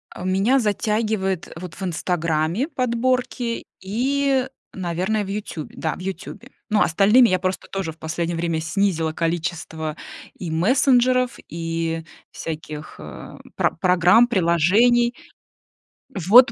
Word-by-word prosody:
Э, - - -7
меня 195 +8 +3
затягивает 210 -4 -1
вот 180 -2 -8
в - - -8
"Инстаграме" 170 - 0
подборки 250 -2 -1 0.2
и, 265 +6 +1 0.3
наверное, 185 +4 -1
в 190 - -7
"Ютубе". 195 -6 -5
Да, 160 - -2
в - - -12
"Ютубе". 195 +7 -7 0.2
Ну, 210 0 +3
остальными 210 +8 +5
я 185 - +2
просто 185 +1 -2
тоже 190 -5 -3
в - - -26
последнее 165 +2 -3
время 165 -1 -1
снизила 165 -2 0
количество 160 -2 -3 0.4
и 170 -3 -5
мессенджеров, 250 - +3
и 165 0 -3 0.3
всяких, 155 -1 -7
э, 75 0 -10 0.2
про - - +2
программ, 180 +7 +4
приложений. 220 +6 +3 1.0
Вот 210 +8 +7
185 Hz, 120 wpm, -22 LUFS, 165-235 Hz, 1.0 s, Вот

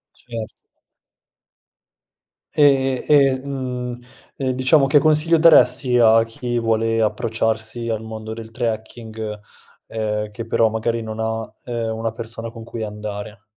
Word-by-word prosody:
Cert 115 -3 -8 2.0
E 135 -3 +3
e 135 -3 +4
mhmm, 125 -3 -4 0.4
uhm, 130 -1 -1
diciamo, 130 +3 +3
che 145 +2 +5
consiglio 155 +2 +4
daresti 130 -6 +5
a 115 -1 +6
chi 120 +1 -3
vuole 115 0 +1
approcciarsi 110 +1 -1
al 110 -1 -2
mondo 110 0 -7
del 115 0 -9
trekking, 110 -2 -5 0.5
uhm, 105 -1 -3
che 115 +2 -7
però 115 0 +2
magari 115 +1 -2
non 110 0 -6
ha, 110 0 -1 0.3
uhm, 120 -2 -3
una 115 0 -2
persona 115 0 -6
con 115 -1 -10
cui 115 0 -6
andare? 105 0 -7
115 Hz, 130 wpm, -21 LUFS, 110-125 Hz, 2.0 s, a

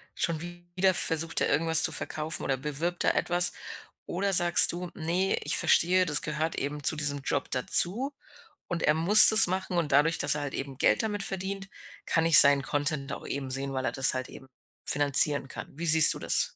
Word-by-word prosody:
schon 165 -2 -4
wieder 175 +2 -4
versucht 165 0 -1
er - - -1
irgendwas 160 +2 +1
zu - - +1
verkaufen 155 +1 -5
oder 135 -1 -3
bewirbt 150 +5 -5
da - - +1
etwas?“ 175 0 -1 0.5
Oder 195 +2 -4
sagst 175 -1 +5
du: 175 0 -8
„Ne, 175 +4 -2
ich - - 0
verstehe, 180 +1 +1
das 150 -1 +2
gehört 155 +2 -4
eben 145 +1 -6
zu 155 - +2
diesem 145 -1 -3
Job - - -5
dazu 195 - 0 0.6
und 170 -2 -6
er 155 - +1
muss 190 +7 +8
das 220 +1 +7
machen 185 0 -5
und 165 -4 -3
dadurch, 150 +4 +1
dass 145 - +1
er 150 - -5
halt 145 -2 -7
eben 135 -1 -8
Geld - - 0
damit 210 -2 -5
verdient, 195 +1 -6 0.4
kann 165 0 -1
ich 165 -2 +7
seinen 140 -1 +4
Content 145 0 -4
auch - - -10
eben 135 -2 -6
sehen, 135 +1 -4
weil 130 0 -5
er - - -3
das 135 -1 +2
halt 130 0 -6
eben 135 - -15 0.4
finanzieren 145 0 +1
kann.“ - - -10
Wie 170 - -6
siehst 160 0 +6
du - - -10
das? - - 0
160 Hz, 205 wpm, -25 LUFS, 145-175 Hz, 0.6 s, muss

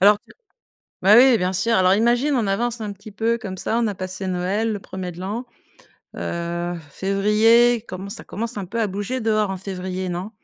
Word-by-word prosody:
alors 205 +2 +6
tu - - -27 0.7
bah 205 +3 +7
oui, 255 -2 +7
bien 185 0 -1
sûr! 230 +5 +2
Alors, 185 -1 +4
imagine, 240 +7 +2
on 225 -5 +1
avance 230 +4 -1
un 210 -1 -3
petit 205 +2 -11
peu 225 +3 0
comme 190 -4 -7
ça. 225 - -1
On 235 - +1
a 205 - -2
passé 185 0 -5
Noël, 190 +5 0
le 205 - -4
1er 185 -2 -6
de 175 - -12
l'an. 210 +7 -4 0.7
Heu, 170 +1 -3 0.2
février, 215 +6 +3
commen 190 +2 -6
ça - - -7
commence 230 +3 -5
un 195 -3 -4
peu 230 +5 -3
à 220 - +2
bouger 205 +6 -3
dehors, 215 -2 +1
en 190 - -3
février, 185 -1 -4
non? 180 +4 -4
200 Hz, 205 wpm, -22 LUFS, 185-225 Hz, 0.7 s, bah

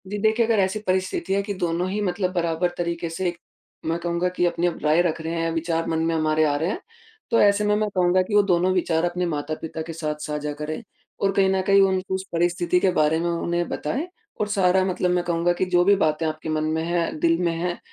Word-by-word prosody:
जी 205 +2 -4
देखिए, 220 +3 +2
अगर 225 -2 +2
ऐसी 190 +2 +1
परिस्थिति 185 +1 0
है 200 - +2
कि 205 0 -4
दोनों 175 -1 -1
ही 205 +2 -2
मतलब 185 -1 -1
बराबर 170 0 0
तरीके 170 -1 -2
से 180 +3 -2
एक 175 - -7 0.5
मैं 165 +1 0
कहूँगा 170 +1 -1
कि 180 -1 0
अपनी 175 0 +1
अब 175 - -3
राय 155 +3 +4
रख 170 -2 -1
रहे 160 +1 -4
है, 165 0 0
विचार 165 0 -1
मन 160 -1 0
में 165 - +1
हमारे 155 0 +2
आ 145 -1 +1
रहे 160 +4 -1
हैं। - - -3 0.5
तो 230 - +4
ऐसे 205 0 +4
में 210 0 +3
मैं 215 0 0
कहूँगा 180 0 +3
कि 195 +3 -2
वो 205 - +7
दोनों 180 -1 +2
विचार 170 -3 +1
अपने 180 +1 -1
माता-पिता 155 0 -4
के 165 +1 -6
साथ 155 -2 -3
साझा 150 0 -3
करें 150 +6 -5 0.4
और 195 - +2
कहीं 195 -1 +3
न 190 0 +1
कहीं 200 0 +6
उनको 190 -1 +1
उस 190 0 -4
परिस्थिति 175 +1 +1
के 185 0 +2
बारे 155 -1 +2
में, 170 +1 -1
उन्हें 170 0 -1
बताएँ 270 - -3 0.3
और 210 - +1
सारा 190 -2 +3
मतलब 180 -1 0
मैं 180 0 +1
कहूँगा 175 0 +1
कि 180 - -1
जो 175 -1 +4
भी 200 +1 +6
बातें 155 -3 +1
आपके 155 0 -4
मन 155 0 0
में 160 +1 -1
हैं, 170 -2 -1
दिल 165 +1 +3
में 170 -1 +1
हैं, 175 +1 -3
175 Hz, 245 wpm, -23 LUFS, 165-190 Hz, 0.5 s, वो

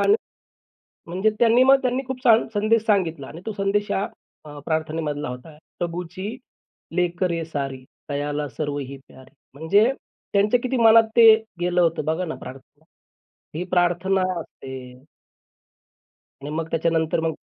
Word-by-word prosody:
आणि 410 - +5 0.9
म्हणजे 185 +5 +1
त्यांनी 235 +1 +5
मग 270 +1 +6
त्यांनी 255 +1 0
खूप 255 -1 -6
छान 230 -2 +5
संदेश 215 +1 +2
सांगितला 170 -10 0
आणि 165 - -10
तो 225 - -3
संदेश 200 +1 0
या 195 - 0 0.4
अ, 145 -1 -9
प्रार्थनेमधला 155 -3 -2
होता. 125 +5 -9 0.2
प्रभूची 180 +6 -4 0.6
लेकरे 175 -1 0
सारी, 135 -4 -4 0.3
तयाला 145 +1 -2
सर्वही 145 -2 -4
प्यारी, 130 0 -17 0.2
म्हणजे 200 - +3 0.4
त्यांच्या 210 +4 +3
किती 255 +1 -1
मनात 225 -1 +7
ते 230 -2 +9 0.3
गेलं 175 0 +1
होतं 165 -3 +1
बघा 160 +4 -1
ना, 160 - -5
प्रार्थना. 130 +1 -12 0.7
ही 170 - -2
प्रार्थना 180 +2 +2 0.2
असते. 135 -4 -11 1.7
आणि 145 - -6
मग 160 +1 -3
त्याच्यानंतर 165 -1 +1
मग 160 -1 -1
175 Hz, 135 wpm, -23 LUFS, 155-210 Hz, 1.7 s, ते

